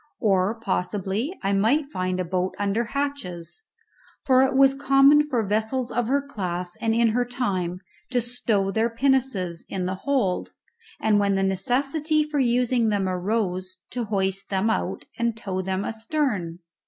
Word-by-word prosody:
Or 200 +1 +1
possibly 205 - -2
I 195 +1 +1
might 275 +9 +2
find 185 -3 -2
a 185 - -1
boat 185 +1 -1
under 205 +4 0
hatches, 280 - -4 0.6
for 260 -1 +5
it 265 0 +2
was 270 0 +6
common 275 +2 +5
for 240 -6 0
vessels 220 +5 -1
of 240 0 0
her 280 +2 +1
class 180 -9 -4
and 225 -1 +1
in 230 0 +4
her 245 +3 +1
time 190 -8 -2 0.3
to 250 -1 +1
stow 225 -5 0
their 225 +3 +1
pinnaces 230 -9 0
in 185 -2 -2
the 185 - -1
hold, 255 -10 0 0.5
and, 215 -1 +3
when 200 -1 +2
the 195 - +1
necessity 275 - +1
for 300 -1 -2
using 245 -2 +2
them 200 -2 0
arose, 185 -1 -2
to 245 -2 -2
hoist 195 -2 -1
them 195 +3 +1
out - - -2
and 235 -1 0
tow 190 -4 -3
them 190 +1 -2
astern. 220 - -2
220 Hz, 160 wpm, -24 LUFS, 190-260 Hz, 0.6 s, was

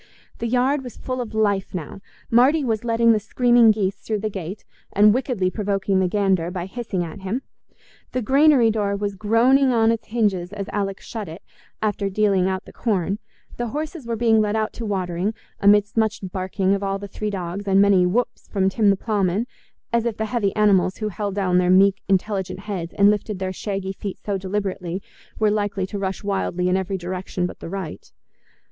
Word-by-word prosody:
The 235 - -2
yard 255 +4 +1
was 245 - -9
full 255 -1 -3
of 225 -2 -6
life 200 -3 0
now: 170 +2 -6 0.3
Marty 265 +6 +5
was 225 -3 -1
letting 230 0 +3
the 220 - +3
screaming 240 +1 +4
geese 200 -2 +1
through 215 -2 -3
the 215 0 -2
gate, 190 +1 -6 0.3
and 205 +1 +6
wickedly 240 -7 0
provoking 195 -2 0
the 185 - +2
gander 190 -3 +1
by 180 -1 -4
hissing 195 -3 -3
at 165 +2 -7
him; 195 +8 -3 0.7
the 255 - -2
granary 270 -1 +5
door 205 -2 0
was 200 0 -2
groaning 235 +7 +3
on 225 -2 +4
its 230 -1 -3
hinges 200 -6 0
as 200 -1 -5
Alick 195 -1 -2
shut 215 -6 -6
it, 165 +3 -10 0.4
after 205 -2 0
dealing 195 -2 +2
out 190 0 -3
the - - -13
corn; 200 -3 -1 0.4
the 240 - -2
horses 300 +1 -5
were 230 - -1
being 225 -1 +3
led 210 0 0
out 220 0 -1
to 230 - -5
watering, 190 +1 -1 0.2
amidst 205 0 +4
much 220 -1 +1
barking 190 +1 -1
of 200 - -1
all 195 0 -1
the 200 +1 -7
three 210 +2 -4
dogs 195 0 -5
and 195 0 +4
many 200 -2 +5
"whups" 210 +8 -1
from 190 -2 +1
Tim 205 +2 +2
the 195 - +3
ploughman, 205 0 0 0.5
as 235 0 +2
if 230 -3 -2
the 220 - -1
heavy 215 -3 0
animals 195 -3 +3
who 215 -1 -2
held 200 0 -4
down 185 -3 +2
their 180 0 +2
meek, 195 +1 +5
intelligent 190 -1 0
heads, 185 -5 -4
and 200 +1 +6
lifted 210 0 -2
their 185 0 -3
shaggy 195 0 -4
feet 195 0 -6
so 205 - -3
deliberately, 190 -2 -3 0.4
were 215 -1 +2
likely 205 -2 -1
to 200 +1 -5
rush 190 0 -3
wildly 190 -3 -1
in 180 - +2
every 190 +1 -1
direction 180 0 -3
but 180 - -6
the - - -7
right. 190 -4 -6
200 Hz, 200 wpm, -22 LUFS, 190-220 Hz, 0.7 s, and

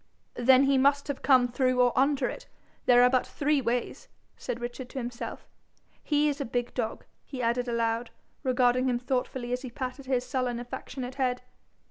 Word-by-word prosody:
'Then 255 +2 +5
he 275 -1 +3
must 280 +2 +3
have 285 -2 -4
come 255 -3 +5
through 255 +1 +1
or 245 -1 +4
under 275 -1 +2
it; - - -7 0.4
there 245 0 +7
are 250 - +6
but 255 -1 +3
three 295 -1 +1
ways,' 245 0 -2 0.3
said 235 - -5
Richard 245 +1 -6
to - - -9
himself. 240 -1 -6 0.5
'He's 295 -1 +1
a - - +1
big 245 +1 -2
dog,' 230 -3 -3 0.2
he 265 - -8
added 245 +1 0
aloud, 230 0 -1 0.3
regarding 255 -1 +2
him 245 - +1
thoughtfully 250 0 -2
as 250 - -2
he 260 - -6
patted 255 +2 -6
his 255 -2 0
sullen 255 -3 -2
affectionate 245 +1 -6
head. 250 -1 0
250 Hz, 175 wpm, -28 LUFS, 245-265 Hz, 0.5 s, there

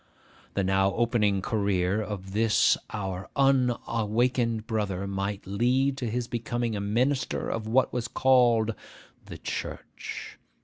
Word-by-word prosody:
The 100 - +1
now 95 +1 +2
opening 105 -5 +2
career 100 -2 +1
of 95 -3 -6
this 110 0 +4
our 95 -3 -4
unawakened 120 -3 +1
brother 100 -4 -2
might 100 +1 -3
lead 125 +7 +1
to 125 -4 -2
his 120 +1 -2
becoming 120 -1 -2
a 100 - -2
minister 125 +7 0
of 110 -1 -3
what 130 +4 +2
was 120 -1 -2
called 120 -4 +3 0.5
'the - - -8
church. - - -6
110 Hz, 125 wpm, -27 LUFS, 100-120 Hz, 0.5 s, this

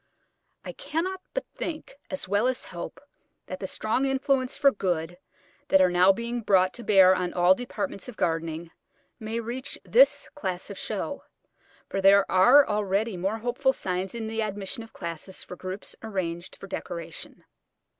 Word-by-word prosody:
I - - -4
cannot 365 +4 -3
but - - -1
think, 315 -2 -5 0.2
as 280 - -4
well 205 +5 +2
as 255 -1 -2
hope, - - -6 0.5
that - - -6
the - - -4
strong 225 +5 0
influences 270 -1 0
for 280 -1 +5
good 175 -4 -2 0.5
that 190 - +5
are 185 -1 +5
now 180 +2 +6
being 235 +4 -3
brought 185 -3 +3
to 240 - -9
bear 190 -4 +7
on 180 -1 -2
all 180 +1 +6
departments 245 +1 -5
of 240 - -11
gardening 165 0 -2 0.5
may 220 +1 -3
reach 240 +4 -5
this - - +4
class 190 -8 -5
of 200 - -8
show, - - -4 0.6
for 195 - -2
there 195 0 +6
are 245 +10 +7
already 210 0 0
more 195 +5 -1
hopeful 245 +4 +1
signs 185 -1 -3
in 230 -1 -4
the 225 0 -2
admission 205 0 -3
of 225 - -11
classes 170 +2 -6
for - - -9
groups 185 +2 -7
arranged 180 -5 -4
for - - -10
decoration. 170 -4 -7
200 Hz, 165 wpm, -27 LUFS, 185-245 Hz, 0.6 s, bear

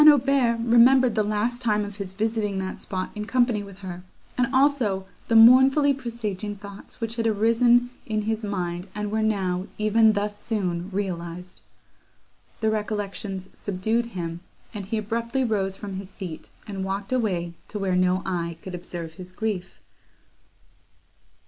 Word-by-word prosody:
Aubert 270 -4 +3
remembered 240 +1 +6
the 215 - +2
last 215 +4 -1
time 210 -3 +1
of 205 0 -8
his 195 -2 -5
visiting 215 -1 -1
that 190 0 -4
spot 185 -1 -4
in 210 -1 -5
company 240 -2 +2
with 200 -2 -10
her, 180 -1 -6 0.3
and 250 0 +2
also 260 -8 +2 0.2
the 230 - +2
mournfully 265 +5 +7
presaging 225 -5 -4
thoughts 200 0 -11
which 230 0 -3
had 230 - 0
then 220 - +3
arisen 235 +3 +4 0.2
in 215 -2 -1
his 220 +1 -2
mind, 180 -3 -3
and 210 -1 -3
were 220 0 +1
now, 190 -4 0
even 215 +1 +4
thus 205 0 -2
soon, 185 -5 -2
realised! 180 -2 -4 1.0
The 220 -1 +2
recollections 205 -3 -3
subdued 220 +5 -1
him, 165 -1 -4 0.3
and 200 -3 -6
he 225 - -1
abruptly 230 +5 -1
rose 195 -5 0
from 195 -2 -6
his 195 -1 -7
seat, 180 -6 -8 0.2
and 195 -3 -4
walked 195 +4 -3
away 180 -9 0
to 210 - -5
where 195 -2 0
no 185 +1 +2
eye 170 -3 -2
could 190 - -7
observe 170 -2 -6
his 185 +1 -8
grief. 200 -1 -4
210 Hz, 155 wpm, -25 LUFS, 190-230 Hz, 1.0 s, mournfully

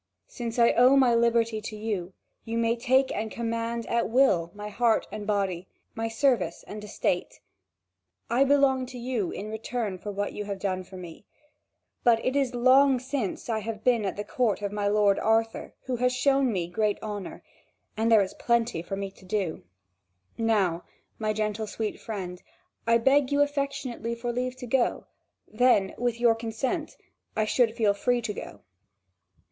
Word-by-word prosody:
Since 235 -1 -6
I 235 -1 +5
owe 255 +3 +5
my 255 -3 +5
liberty 230 -1 +2
to 215 - -6
you, 205 -4 -3 0.3
you 230 0 -3
may 230 0 +2
take 260 +2 +2
and 220 +1 -2
command 230 0 -3
at 235 -1 0
will 225 -9 +3
my 210 0 -6
heart 230 +1 +2
and 210 -1 -6
body, 195 -3 -1 0.3
my 225 0 -2
service 225 -6 +1
and 210 0 -7
estate. 185 -3 -2 0.9
I 240 +4 +3
belong 270 -2 +3
to 255 0 -9
you 235 -6 -2
in 210 +2 -6
return 220 -3 -3
for 205 - -5
what 205 0 -3
you 210 - -5
have 200 -1 -4
done 185 -1 -2
for 185 +1 -12
me; 175 +1 -10 0.8
but 235 -2 +5
it 255 - 0
is 270 -3 +1
long 260 +2 +5
since 255 -5 -3
I 225 -2 0
have 215 0 -6
been 240 -3 +3
at 195 - -2
the 205 - -2
court 220 -3 0
of 200 - -2
my 205 -1 -1
lord 205 -1 +3
Arthur, 225 0 0
who 255 -2 -2
has 250 +1 +2
shown 270 0 +2
me 180 -5 -1
great 210 +3 0
honour; 205 -3 -6 0.5
and 225 +2 +1
there 215 -3 +7
is 190 - -6
plenty 235 -7 0
there 175 - -16
for 195 - -1
me 195 0 -4
to 190 - -20
do. 185 -3 -2 0.7
Now, 200 -7 +1 0.4
my 215 - -2
sweet 215 - -1
gentle 215 0 -1 0.3
friend, 185 -5 -6 0.5
I 230 0 +5
beg 270 +3 +3
you 285 0 +4
affectionately 275 -5 -3
for 240 +1 -3
leave 250 +1 -2
to 255 -1 -8
go; 245 +1 +1 0.4
then, 215 -4 +3
with 240 -1 -1
your 235 -1 +5
consent, 240 +8 -3 0.4
I 215 - +1
should 225 0 +2
feel 215 -4 +3
free 240 +4 0
to 215 -2 -2
go." 100 - -9
225 Hz, 180 wpm, -27 LUFS, 205-245 Hz, 0.9 s, there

